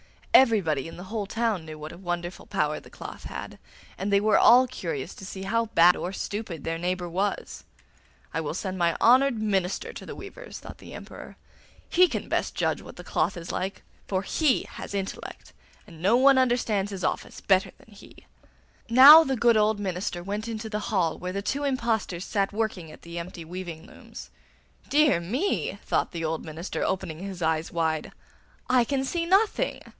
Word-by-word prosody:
Everybody 190 - +4
in 165 - -10
the 180 - -8
whole 205 +1 -4
town 225 -6 -1
knew 155 -1 -8
what 155 +1 -8
a 170 - -11
wonderful 175 -1 -5
power - - -1
the - - -16
cloth - - -10
had, - - -7 0.4
and 200 +1 -2
they 200 - +5
were 215 0 +4
all 250 +2 +7
curious 170 - -5
to 190 - -11
see 190 0 -7
how 230 +4 0
bad 175 -3 +5
or - - -4
how 195 - -7
stupid 200 -8 -5
their 165 0 -3
neighbour 180 +1 -2
was. 190 +4 -3 0.7
'I 160 - -1
will 155 - -3
send 190 0 -4
my 170 -1 +3
old - - -7
and - - -9
honoured 255 0 +5
minister 195 -3 -1
to - - -9
the - - -8
weavers,' - - -9
thought - - -11
the - - -12
Emperor. - - -10 0.5
'He 365 +1 +5
can - - -3
judge - - -16
best - - -1
what - - -12
the - - -10
cloth - - -1
is 170 0 -6
like, 190 +2 -4 0.2
for 190 -1 -1
he 290 - +1
has - - -8
intellect, 195 -1 -6 0.3
and 165 -6 -14
no 200 +6 +4
one 270 +1 +6
understands 235 -6 +1
his 190 -2 -6
office - - -2
better 190 -1 +2
than 220 - -20
he.' 200 - -16 0.6
Now 280 +7 +10
the 270 -3 -1
good 235 -1 +4
old 215 0 +2
minister 180 -2 -3
went 205 +4 -4
into 220 -1 -5
the 210 -1 -2
hall 180 -6 0
where 180 0 -4
the 200 +1 -3
two 280 +7 -2
impostors 230 -9 -1
sat 200 -2 0
working 210 -6 -2
at - - -15
the 170 0 -6
empty 170 -1 -8
weaving 170 -1 -7
looms. - - -12 0.6
'Dear 295 - +4
me!' 245 - -1
thought - - 0
the 165 -2 -4
old 160 0 -2
minister, 160 +3 -5
opening 180 -4 -2
his 190 -2 -6
eyes 160 0 0
wide, 160 -2 -1 0.6
'I 250 -2 +4
can 270 +1 -1
see 335 +5 -2
nothing! 420 +6 +2
195 Hz, 195 wpm, -26 LUFS, 175-230 Hz, 0.7 s, Now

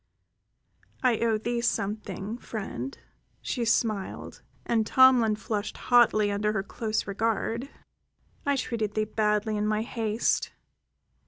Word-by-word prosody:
"I 245 -4 +3
owe 230 -2 +2
thee 235 +2 -2
something, 210 -1 -2
friend," 135 - -5 0.4
she 245 -4 -2
smiled, 215 -3 -1 0.2
and 230 -2 +2
Tomlin 245 -2 +5
flushed 210 -1 -4
hotly 220 -4 +4
under 210 +1 0
her 195 -3 -1
close 220 +1 -2
regard. 225 +5 -1 0.7
"I 285 0 +1
treated 220 -5 -2
thee 215 0 +1
badly 210 0 0
in 210 0 0
my 215 0 +1
haste. 225 -1 -1
220 Hz, 115 wpm, -27 LUFS, 210-235 Hz, 0.7 s, Tomlin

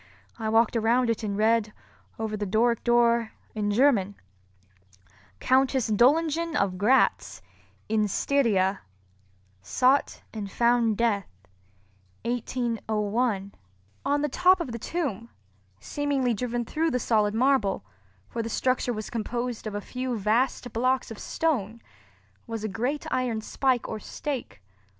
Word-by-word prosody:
I 220 -1 -2
walked 225 +1 +3
around 230 +2 +2
it 225 - -3
and 205 -2 -3
read, 215 0 +2 0.4
over 220 -1 -3
the 205 -1 -3
Doric 230 +4 +2
door, 235 -1 +3 0.2
in 210 -1 -1
German— 205 -4 +3 1.2
COUNTESS 260 -2 +2
DOLINGEN 315 +8 +2
OF 190 -7 0
GRATZ 250 +7 +2 0.4
IN 215 -1 +1
STYRIA 205 -5 +1 0.8
SOUGHT 255 - +1
AND 210 -3 -5
FOUND 235 -2 +2
DEATH 215 -5 +1 1.0
1801 225 -3 -1 0.5
On 285 +1 +1
the - - +2
top 365 +6 +4
of 330 -8 -4
the 235 - -5
tomb, 235 - -3 0.5
seemingly 275 - -1
driven 240 +1 -2
through 320 +6 0
the 250 - 0
solid 215 -3 +1
marble—for 105 - -1
the 225 - -4
structure 255 +1 0
was 215 -1 -6
composed 235 0 -3
of 210 - -5
a 205 - -3
few 250 +2 -4
vast 230 +3 0
blocks 255 +1 0
of 225 - -8
stone—was 190 - -5
a - - -1
great 250 +9 -2
iron 245 -3 0
spike 255 +2 0
or 220 - -5
stake. 250 - -6
230 Hz, 125 wpm, -26 LUFS, 210-255 Hz, 1.2 s, top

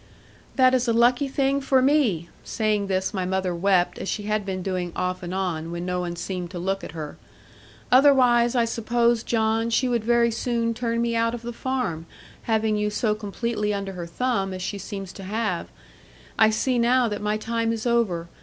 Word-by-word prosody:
'That 255 -1 +5
is 255 -1 +2
a 230 - +2
lucky 245 +4 +3
thing 275 +1 0
for 270 -1 +3
me'; 255 - +2 0.2
saying 215 -2 0
this 190 +1 -1
my 190 -2 -1
mother 185 0 -1
wept, 180 0 +1
as - - -4
she 210 - -2
had 210 0 -1
been 190 -2 -4
doing 180 -2 -2
off 180 0 -2
and 175 -1 -6
on, 180 -4 -2
when 170 +1 -4
no 180 0 -1
one 175 -1 -3
seemed 175 0 -4
to 180 - -7
look 195 +3 -2
at - - -8
her; 155 -3 -7 0.7
'otherwise 250 -3 +5
I 235 -1 +3
suppose, 235 +1 +1
John, 225 0 0
she 245 +3 +2
would 240 -3 0
very 235 0 +3
soon 230 0 -1
turn 230 0 -1
me 235 0 0
out 230 +1 +1
of 235 - -9
the 240 0 -5
farm, 235 -11 -3 0.4
having 220 -1 +2
you 210 0 0
so 210 +1 0
completely 210 0 -2
under 195 -1 -4
her 175 -2 -6
thumb, 195 -1 -1
as 185 - -6
she 200 +1 -4
seems 195 -1 -7
to 195 - -10
have. 205 -2 -2 0.7
I 220 - +5
see 245 +3 0
now 245 +1 +3
that 210 -2 -4
my 210 0 0
time 230 +1 -1
is 225 0 -4
over. 215 -9 +1
220 Hz, 200 wpm, -24 LUFS, 190-235 Hz, 0.7 s, That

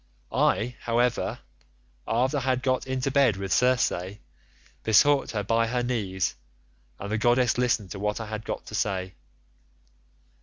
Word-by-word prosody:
I, 120 +2 +1
however, 120 +1 0 0.7
after 130 +6 +1
I - - -1
had 130 0 0
got 130 -1 0
into 130 +1 -1
bed 130 -7 +3
with 95 -1 -2
Circe, 120 -7 +1 0.7
besought 135 +6 +4
her 105 -2 -2
by 115 +3 +1
her 125 +1 -1
knees, 100 -7 -1 0.7
and 100 +1 -6
the 110 - 0
goddess 120 +1 +3
listened 115 -6 0
to 100 - -6
what 105 +2 -1
I 115 - -4
had 110 0 -5
got - - -5
to - - -11
say. 95 -4 -2
115 Hz, 150 wpm, -26 LUFS, 105-125 Hz, 0.7 s, besought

